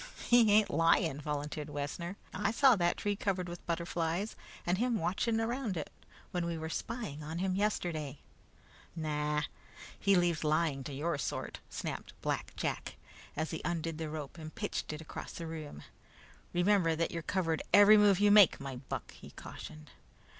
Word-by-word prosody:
"He 240 -3 +6
ain't 210 0 +5
lying," 165 -1 +3
volunteered 150 +1 -3
Wessner. 150 +6 -4 0.2
"I 200 +2 0
saw 255 +3 +6
that 175 -3 +1
tree 205 0 0
covered 190 -3 -1
with 175 0 -7
butterflies 170 +3 -1 0.3
and 180 +2 +1
him 240 -1 +2
watching 220 +6 0
around 225 -3 -1
it 155 - -4 0.4
when 175 -1 -1
we 170 -1 -2
were 160 0 -4
spying 160 - -4
on 155 +2 -5
him 185 +1 0
yesterday." 175 -8 -1 0.8
"No, 150 -2 0 0.6
he 200 0 +4
leaves 175 -3 +2
lying 155 -3 +1
to 145 - -5
your 150 +2 -1
sort," - - -3
snapped - - -6
Black - - -2
Jack, - - -3 0.4
as 155 +1 -1
he 160 - -4
undid 165 -2 -2
the 160 -1 -3
rope 150 +1 -6
and 155 0 -8
pitched - - -3
it 155 +1 -6
across 160 - -7
the 165 - -6
room. 155 - -7 0.7
"Remember 175 -2 +3
that 165 +1 0
you're 170 - -3
covered 165 -1 0
every 205 +1 +9
move 205 -3 +5
you 205 0 +5
make, 205 -4 +7
my 135 -2 -5
buck," 130 - -6
he - - -12
cautioned. 155 -2 -10
170 Hz, 170 wpm, -33 LUFS, 155-200 Hz, 0.8 s, every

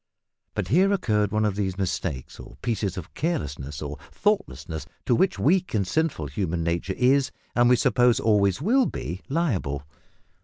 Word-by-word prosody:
But 90 - -2
here 185 - +4
occurred 105 - +1
one 110 0 +1
of 105 -2 0
these 95 -2 -2
mistakes, 85 -8 -3
or - - -11
pieces 105 -6 -1
of 90 - -7
carelessness, 75 - -3
or 75 0 -6
thoughtlessness, 200 - -1 0.2
to - - +3
which 185 +10 +2
weak 180 -1 +2
and 100 -2 +2
sinful 155 - 0
human 85 +3 -2
nature 85 +3 -1
is, 135 +2 +3 0.3
and 120 0 +5
we 125 - +7
suppose 120 0 +3
always 100 -3 +3
will 250 +6 +4
be, 90 +3 -5
liable. 105 - -1
105 Hz, 160 wpm, -25 LUFS, 85-140 Hz, 0.3 s, we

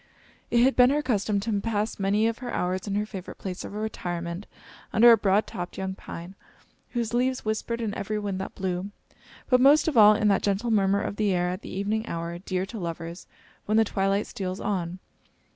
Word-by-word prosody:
It 235 0 +4
had 265 +1 +4
been 250 0 +6
her 295 +2 +1
custom 210 -5 0
to 205 -1 -1
pass 215 -1 -2
many 200 +3 +2
of 230 0 0
her 245 -1 -5
hours 185 +2 -2
in 200 - -1
her 210 +1 0
favorite 195 -4 -8
place 185 -1 -5
of - - -8
retirement 175 -4 -4 0.4
under 235 +2 +7
a - - +9
broad 205 0 +2
topped 175 -1 -6
young 190 0 -3
pine, 175 -1 -9 0.6
whose 235 -2 -2
leaves 255 +1 0
whispered 220 +2 -2
in 220 -3 -2
every 210 +2 -3
wind 200 -2 -3
that 190 - -7
blew; 185 0 -3 0.6
but 250 -1 +4
most 290 +4 +6
of 310 - 0
all 210 -1 +8
in 210 - +1
that 195 - +3
gentle 205 +4 0
murmur 200 -1 +3
of 200 - -4
the 210 -2 +2
air 180 0 +1
at 185 +2 -4
the - - -9
evening 210 +4 -2
hour, 170 +1 -4
dear 185 0 -2
to 220 +2 -8
lovers, 170 0 -6 0.4
when 215 +1 +2
the 225 - +5
twilight 195 0 0
steals 185 -1 -5
on. 180 -3 -2
205 Hz, 210 wpm, -26 LUFS, 185-220 Hz, 0.6 s, a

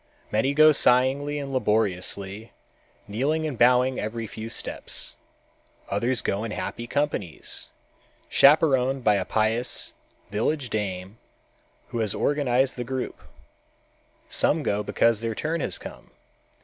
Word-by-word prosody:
Many 130 +6 +1
go 155 +1 +8
singly 140 +2 +2
and 140 -1 -5
laboriously, 105 -2 -1 0.5
kneeling 140 +10 0
and 150 -4 -3
bowing 125 +2 +4
every 115 +2 -3
few 110 +1 -7
steps. - - -2 0.7
Others 115 +3 0
go 100 +2 -1
in 115 - -3
happy 115 +2 -5
companies, 140 - -3 0.6
chaperoned 135 -3 +4
by 105 - +5
a 95 -2 0
pious, 115 +3 0 0.4
village 120 +4 -1
dame, 95 0 -4 0.7
who 120 - -3
has 110 -3 0
organized 135 -3 +1
the 120 - -2
group. 130 +1 -4 1.1
Some 165 - +1
go 105 -4 0
because 115 +1 +2
their 115 -1 -2
turn 160 +5 -2
has - - -2
come. - - -11
120 Hz, 125 wpm, -25 LUFS, 110-140 Hz, 1.1 s, go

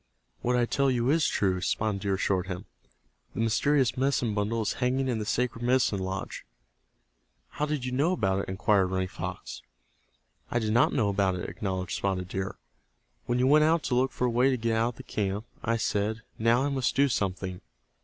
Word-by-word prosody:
"What 125 +1 +1
I 120 -1 +3
tell 140 +3 +1
you 125 0 +1
is 160 0 +3
true," 95 -2 0
Spotted 105 0 -1
Deer 100 -1 0
assured 95 -1 0
him. 90 -2 -5 0.7
"The - - -4
mysterious 125 +3 +2
medicine 130 -4 +1
bundle 110 +2 0
is - - -1
hanging 130 +2 +1
in 120 -3 0
the 105 - -4
sacred 120 0 -1
medicine 125 -5 +2
lodge." 95 0 -4 1.1
"How 150 - -2
did 150 -4 -2
you 125 - -3
know 145 +7 +2
about 95 - +1
it?" 100 - -4
inquired 95 0 +2
Running 95 0 -1
Fox. - - -6 0.9
"I - - -1
did 110 -2 0
not 120 - +4
know 110 -6 +1
about 95 -2 +1
it," 90 - -4
acknowledged 95 0 -4
Spotted 95 -2 -2
Deer. 95 0 -4 0.7
"When 120 - +1
you 125 - +2
went 150 +3 +5
out 160 0 +2
to - - -2
look 130 +2 +2
for 125 - -1
a 125 - +1
way 125 +3 +3
to 130 - +1
get 115 -1 0
out 115 +2 +1
of - - -27
the 130 - -9
camp, 105 -2 -2 0.2
I 115 0 +1
said, 110 +1 -1 0.2
'Now 115 +3 +3
I 145 - +1
must 135 -3 0
do 140 +1 +4
something. 95 -6 -2
115 Hz, 205 wpm, -28 LUFS, 100-130 Hz, 1.1 s, went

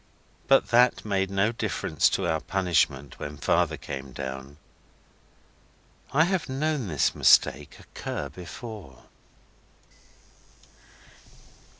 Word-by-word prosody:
But 135 0 +4
that 120 0 +4
made 95 -2 0
no 100 +3 +1
difference 115 - 0
to 95 - -1
our 80 -2 0
punishment 85 -7 0
when 75 0 -6
Father 70 - +1
came 70 -2 -7
down. 65 +1 -7 1.5
I 155 +3 +4
have 175 -3 -1
known 140 -2 -1
this 75 -7 +1
mistake - - +3
occur - - -6
before. 90 - -10
95 Hz, 95 wpm, -26 LUFS, -, 1.5 s, But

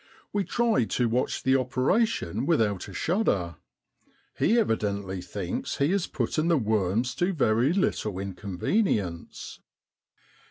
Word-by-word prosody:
We 200 -2 0
try 230 - +2
to 120 +2 0
watch 120 +3 -1
the 130 0 +3
operation 130 - 0
without 105 - +1
a 100 - -10
shudder: 100 - 0 0.8
he 230 - +2
evidently 100 - -1
thinks 90 0 -4
he 140 +4 +2
is 195 -3 0
putting 155 +1 -1
the 170 -2 +4
worms 110 +1 0
to 180 +7 0
very 125 -3 +2
little 110 - 0
inconvenience. 95 - -2
115 Hz, 120 wpm, -27 LUFS, -, 0.8 s, the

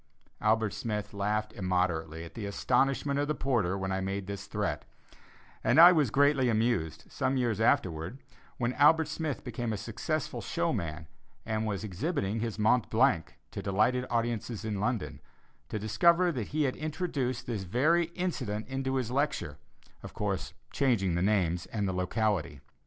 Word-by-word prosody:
Albert 110 -1 +2
Smith 105 -3 -4
laughed 105 +1 -1
immoderately 85 -4 -1
at 85 - -10
the 105 -3 -5
astonishment 135 +6 +1
of 145 - 0
the 150 - 0
porter 115 -9 0
when 95 0 -3
I 95 0 -1
made 95 +1 -3
this 100 0 -6
threat, - - -2 0.8
and 120 +7 +4
I 175 +2 +11
was 150 -8 +3
greatly 140 0 +3
amused, 110 -8 0
some 135 - 0
years 115 -4 0
afterwards, 90 +1 +1 0.4
when 120 0 0
Albert 155 +3 +5
Smith 155 -2 -3
became 120 -3 -3
a 110 - -2
successful - - -3
showman 80 -1 -2 0.4
and 110 0 -1
was 105 -1 -2
exhibiting 110 - -2
his 115 -1 -3
"Mont 110 +3 +2
Blanc" 115 -7 +2 0.2
to - - -5
delighted 115 +6 +1
audiences 115 -1 -2
in 105 -2 -2
London, 115 0 -2 0.5
to - - -3
discover 170 - +3
that 120 -9 -3
he 155 0 0
had 130 -3 0
introduced 145 -6 -2
this 115 -5 -3
very 145 - +2
incident 125 - -2
into 135 0 -2
his 125 -3 -1
lecture, 135 - -1 0.4
of - - -10
course, - - -3 0.2
changing 115 -10 +2
the 85 - 0
names 90 -4 +1
and 105 -3 -2
locality. 90 - -1
110 Hz, 155 wpm, -30 LUFS, 100-135 Hz, 0.8 s, I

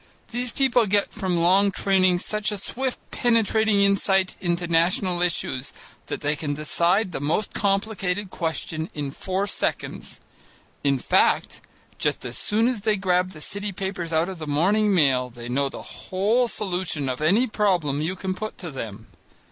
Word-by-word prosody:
These 245 +1 -2
people 245 -3 +2
get 205 +1 +1
from 190 -5 -1
long 185 +4 +4
training 185 -2 +3
such 210 +3 -2
a 210 - -3
swift 255 +6 -3
penetrating 220 -3 +2
insight 195 -1 +2
into 175 -1 0
national 175 +2 +1
issues 170 -7 -1 0.3
that - - -4
they 150 +1 0
can 145 -2 -3
decide 175 +6 +2
the - - -4
most 160 +8 0
complicated 195 -1 -1
question 160 -1 -3
in 145 -2 -3
four 190 +6 -2
seconds: 205 - -3 0.6
in 140 -1 +3
fact, - - +2 0.4
just - - -1
as - - -4
soon 220 +3 +1
as 245 -5 -1
they 215 0 +2
grab 185 -2 +1
the 155 - -10
city 200 +5 -3
papers 190 -3 -4
out 160 +1 +2
of 190 -3 -6
the 155 - -6
morning 200 +9 +2
mail, 135 -8 +3
they 120 0 -9
know 135 +3 0
the - - -8 0.3
whole 215 +6 +2
solution 180 -9 -2
of 130 +2 -3
any 195 +11 +4
problem 180 - +1
you 170 +5 -1
can 185 0 -3
put 215 +3 -6
to 175 -4 -7
them. 110 -5 -7
185 Hz, 165 wpm, -24 LUFS, 160-205 Hz, 0.6 s, long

